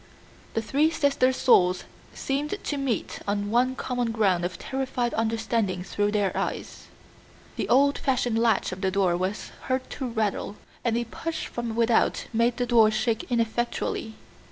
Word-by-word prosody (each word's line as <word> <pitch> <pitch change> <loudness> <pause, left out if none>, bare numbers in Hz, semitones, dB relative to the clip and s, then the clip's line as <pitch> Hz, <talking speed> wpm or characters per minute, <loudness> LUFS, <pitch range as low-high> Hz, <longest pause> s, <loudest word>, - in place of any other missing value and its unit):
The 225 - 0
three 285 +8 +2
sisters' 275 -4 +2
souls 180 -7 +4 0.3
seemed 290 +6 -2
to 290 - -2
meet 270 -5 -2
on 205 0 -1
one 255 +2 +2
common 245 -3 -2
ground 195 -6 +2
of 175 -1 -3
terrified 260 -1 -2
understanding 220 -4 0
through 205 +2 0
their 205 -2 0
eyes. - - -4 0.7
The - - -3
old 280 +3 +4
fashioned 245 -4 +1
latch 230 -4 +2
of 185 0 -6
the 190 - +2
door 190 -2 +2
was 185 +3 -3
heard 260 0 -1
to 265 - -4
rattle, 215 -3 -2 0.3
and 235 -1 +1
a 240 - 0
push 320 +8 -5
from 235 -2 -4
without 230 0 +2
made 235 +1 +2
the 245 - 0
door 230 -3 +5
shake 220 +2 -1
ineffectually. 230 -1 -1
230 Hz, 155 wpm, -26 LUFS, 210-255 Hz, 0.7 s, door